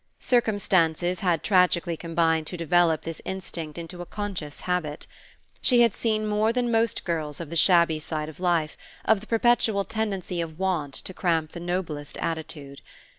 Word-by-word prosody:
Circumstances 185 -7 +1
had 175 -4 +1
tragically 180 -3 +3
combined 165 -1 0
to 180 - -5
develop 165 -1 +2
this 165 -1 -5
instinct 170 -5 -6
into 170 +1 -7
a - - -6
conscious 195 -8 -5
habit. 175 -5 -2 0.6
She 245 -2 +5
had 230 -3 +4
seen 215 -2 0
more 210 +1 +2
than 240 0 0
most 225 0 +1
girls 155 -4 -2
of 165 -2 -7
the - - -4
shabby 170 -2 +4
side 155 0 -3
of 155 - -10
life, 170 -4 +1 0.3
of 220 -2 +4
the 220 - -12
perpetual 225 -3 +2
tendency 200 -5 -2
of 160 -2 -6
want 170 -7 -1
to 190 - -5
cramp 165 -4 0
the 170 - -7
noblest 170 -4 -3
attitude. 150 -4 -5
175 Hz, 165 wpm, -26 LUFS, 160-200 Hz, 0.6 s, She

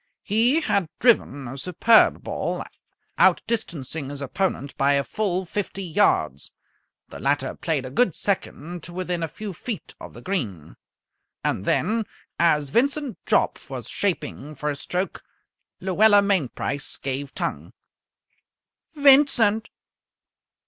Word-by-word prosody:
He 235 +9 +3
had 200 - 0
driven 145 - +2
a 135 +3 -7
superb 185 - +4
ball, - - -3 0.6
outdistancing 160 - +1
his 145 0 -7
opponent 140 0 -2
by 140 +1 +3
a 140 0 +2
full 190 +1 -1
fifty 195 +1 -4
yards. 155 - +1 0.6
The - - -9
latter 140 +2 0
played 150 -6 -1
a 130 - -7
good 195 - +2
second 175 -3 -3
to 175 - -10
within 180 -1 -2
a 165 - -1
few 205 +4 -7
feet 215 +5 -6
of - - -10
the - - -10
green. 105 - -3 0.7
And 95 - -1
then, 220 +2 +1 0.3
as 150 -5 +3
Vincent 275 +1 0
Jopp - - +2
was - - -6
shaping 155 -6 -3
for 150 +2 -2
his 145 -1 -3
stroke, 180 +5 -3 0.6
Luella 205 +2 +5
Mainprice 145 -7 -1
gave 135 +1 -4
tongue. - - -3 1.2
"Vincent!" 270 -7 +5
180 Hz, 125 wpm, -24 LUFS, 140-215 Hz, 1.2 s, Luella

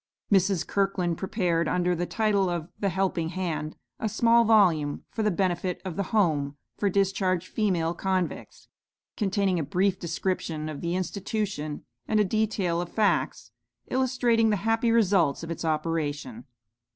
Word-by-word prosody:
Mrs. 190 -2 +3
Kirkland 195 -4 0
prepared, 175 -4 0
under 180 0 +1
the 175 0 -2
title 205 -4 +1
of 170 -1 -3
"The 200 - +1
Helping 180 -3 -1
Hand," 165 -4 -3 0.2
a 220 - -1
small 230 +2 +4
volume, 170 -10 +3
for 225 - -3
the 215 - +2
benefit 180 -1 -1
of 180 -4 -4
"The 200 0 -3
Home" 150 -9 +1 0.2
for 205 - +2
discharged 190 -2 +1
female 175 -6 0
convicts, 185 0 -3 0.5
containing 195 -3 +1
a - - -1
brief 185 +6 0
description 165 -3 -2
of 150 -2 -6
the 170 +1 -1
institution, 185 -4 -3 0.2
and 215 - +2
a 210 - +4
detail 195 -4 0
of 175 - -5
facts 215 -2 0 0.4
illustrating 245 -3 +2
the 210 - +3
happy 225 +1 +2
results 190 -10 +3
of 165 - -5
its 165 - -5
operation. 150 -6 -2
185 Hz, 150 wpm, -27 LUFS, 165-205 Hz, 0.5 s, small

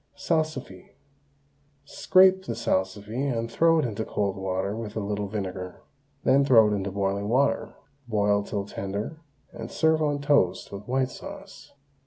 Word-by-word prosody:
SALSIFY. 155 - -3 0.9
Scrape 190 +3 +4
the - - -3
salsify 100 +3 -2 0.2
and 115 0 -3
throw 165 +3 +4
it 155 - +2
into 110 -2 -3
cold 100 -3 -2
water 95 +1 -2
with 110 -2 -6
a - - -1
little 105 0 -3
vinegar. 95 -3 -5 0.4
Then 135 +1 +4
throw 115 -6 +6
it - - +1
into 100 0 -2
boiling 100 +1 -2
water, 135 +4 +1 0.3
boil 105 -2 +2
til 100 -1 -4
tender, 100 +10 -5 0.3
and 115 +1 -7
serve 160 0 +2
on 145 -2 0
toast 140 -11 +1
with 100 +1 -8
white 130 0 0
sauce. - - -11
105 Hz, 150 wpm, -26 LUFS, 100-140 Hz, 0.9 s, throw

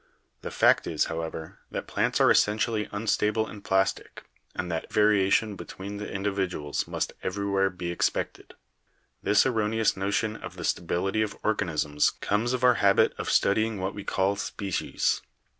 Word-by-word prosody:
The - - -5
fact - - +3
is, - - +1
however, 80 -1 -6
that - - -4
plants - - 0
are - - +6
essentially 105 +1 +2
unstable 105 +1 +1
and 105 -2 -10
plastic, 95 0 0 0.3
and 90 - -3
that 80 - -4
variation 105 0 +3
between 100 +2 -7
the 105 - -6
indi 100 +1 -1
viduals 90 -7 -2
must - - -2
everywhere 100 0 0
be 90 -1 -5
expected. 85 - -2 0.7
This 105 0 +4
erroneous 110 -3 +1
notion 100 +3 -1
of - - -9
the - - -6
stability 95 +5 0
of 110 - -2
organisms 75 -8 +1
comes 110 +4 0
of 125 0 -2
our 125 -1 +5
habit 100 -1 +4
of - - -3
studying 110 +2 +2
what 95 +1 -2
we 100 - -7
call 95 +1 +1
species. 100 -1 -1
100 Hz, 155 wpm, -27 LUFS, 95-105 Hz, 0.7 s, are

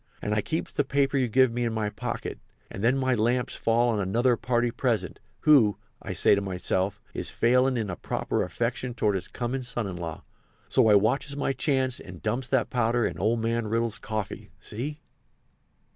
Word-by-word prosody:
And 105 - -2
I 105 - +2
keeps 160 +10 -3
the 145 - +1
paper 140 0 +1
you 130 -2 +2
give 130 +2 +4
me 120 +1 -1
in 115 -1 -1
my 110 -2 -1
pocket. - - -5 0.3
And 100 - -6
then 125 +4 +3
my 130 -1 +1
lamps 120 +2 +1
fall 120 +1 +2
on 110 -3 0
another 120 +6 +2
party 120 0 0
present, 120 -3 -1 0.2
who, 130 -9 +5 0.2
I - - -5
says 100 - +4
to - - 0
myself, 95 +1 -1
is - - -4
failin' 125 +2 +3
in 105 -5 -2
a - - -4
proper - - -2
affection 120 +1 -2
toward 105 -3 +1
his 95 - -3
comin' 125 +2 -3
son 120 -2 -3
in 95 -3 -5
law, 85 -3 -6 0.5
so 125 -4 +4
I 105 - +7
watches 135 +8 +1
my 135 -1 0
chance 130 -2 0
and 90 -2 -10
dumps 125 +1 -1
that 130 -1 +1
powder 120 -1 +2
in - - -3
old 110 +4 +1
man 115 0 0
Riddle's 115 0 0
coffee—see?" 110 +6 -6
120 Hz, 190 wpm, -27 LUFS, 105-130 Hz, 0.5 s, I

